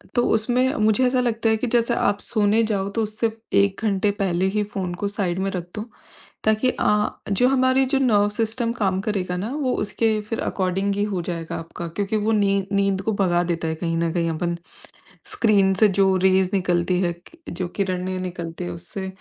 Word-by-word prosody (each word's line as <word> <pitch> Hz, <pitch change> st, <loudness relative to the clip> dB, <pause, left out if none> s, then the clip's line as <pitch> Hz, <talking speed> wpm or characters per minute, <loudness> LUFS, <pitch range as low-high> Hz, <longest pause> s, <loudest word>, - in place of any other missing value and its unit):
तो 240 Hz, -, +3 dB
उसमें 245 Hz, +4 st, +2 dB
मुझे 215 Hz, +3 st, +3 dB
ऐसा 250 Hz, 0 st, +1 dB
लगता 230 Hz, -2 st, 0 dB
है 220 Hz, -, +3 dB
कि 250 Hz, -, -2 dB
जैसे 235 Hz, 0 st, +2 dB
आप 200 Hz, -3 st, +1 dB
सोने 215 Hz, 0 st, +2 dB
जाओ 200 Hz, -3 st, -1 dB
तो 225 Hz, -, +1 dB
उससे 215 Hz, +2 st, -1 dB, 0.3 s
1 200 Hz, 0 st, +2 dB
घंटे 205 Hz, -1 st, +1 dB
पहले 185 Hz, -2 st, +1 dB
ही 210 Hz, -, +2 dB
फोन 185 Hz, -3 st, -3 dB
को -, -, +2 dB
साइड 190 Hz, -3 st, -2 dB
में 195 Hz, +1 st, 0 dB
रख 180 Hz, -2 st, -3 dB
दो 210 Hz, -, -3 dB, 0.6 s
ताकि 220 Hz, +4 st, +2 dB
अ, 210 Hz, -3 st, +1 dB, 0.2 s
जो 225 Hz, +6 st, +3 dB
हमारी 260 Hz, 0 st, +3 dB
जो 270 Hz, -, +4 dB
नर्व 210 Hz, -6 st, +3 dB
सिस्टम 230 Hz, +1 st, 0 dB
काम 190 Hz, -4 st, 0 dB
करेगा 190 Hz, -4 st, -2 dB
ना 205 Hz, +6 st, -3 dB
वो 275 Hz, -4 st, 0 dB
उसके 220 Hz, +1 st, 0 dB
फिर 225 Hz, -, -2 dB
अकॉर्डिंग 195 Hz, +1 st, -1 dB
ही 205 Hz, -, 0 dB
हो 180 Hz, -, -1 dB
जाएगा 165 Hz, -2 st, -4 dB
आपका 165 Hz, +1 st, -7 dB
क्योंकि 200 Hz, +5 st, -2 dB
वो 215 Hz, +1 st, 0 dB
नीं 200 Hz, -2 st, +2 dB
नींद 195 Hz, -1 st, +1 dB
को 220 Hz, -, 0 dB
भगा 175 Hz, -2 st, +2 dB
देता 165 Hz, -1 st, -2 dB
है 160 Hz, -, -2 dB
कहीं 165 Hz, 0 st, -2 dB
न 165 Hz, 0 st, 0 dB
कहीं 170 Hz, -1 st, 0 dB
अपन 170 Hz, +2 st, -2 dB, 0.8 s
स्क्रीन 200 Hz, -4 st, +3 dB
से 210 Hz, +3 st, +5 dB
जो 190 Hz, -1 st, +4 dB
रेज़ 190 Hz, -1 st, +3 dB
निकलती 180 Hz, -1 st, +1 dB
है, 175 Hz, -2 st, 0 dB, 0.4 s
जो 180 Hz, +1 st, -4 dB
किरणें 185 Hz, -1 st, -2 dB
निकलती 175 Hz, -2 st, -5 dB
हैं 90 Hz, -, -4 dB
उससे, 90 Hz, -, -6 dB
200 Hz, 200 wpm, -23 LUFS, 180-220 Hz, 0.8 s, से